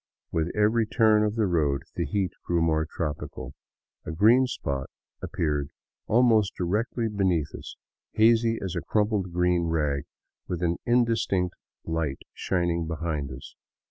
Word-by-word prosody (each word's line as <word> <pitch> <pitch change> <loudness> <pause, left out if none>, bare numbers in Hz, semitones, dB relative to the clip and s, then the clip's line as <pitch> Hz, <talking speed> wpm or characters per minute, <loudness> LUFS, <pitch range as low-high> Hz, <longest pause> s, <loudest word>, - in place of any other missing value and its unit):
With 80 +1 0
every 110 +2 +3
turn 110 -2 +4
of 105 0 0
the 110 -2 +2
road 75 -7 +1
the 85 -3 -1
heat 95 +3 -1
grew 85 -1 0
more 80 -1 +1
tropical. 75 -3 -5 0.5
A - - -7
green 115 +10 +5
spot 70 - -3 0.3
appeared 75 -3 -1 0.4
almost 110 -3 +3
directly 110 +6 -1
beneath 95 -8 0
us, - - -8 0.4
hazy 115 +1 +4
as 95 -2 -3
a 85 - -1
crumpled 105 -4 0
green 90 0 +2
rag 75 -3 0 0.4
with 90 -1 -3
an 85 0 +1
indistinct 115 -7 +2 0.3
light 80 -4 -2
shining 85 -3 -1
behind 80 -3 -3
it. 70 +2 -9
90 Hz, 140 wpm, -26 LUFS, 80-110 Hz, 0.5 s, green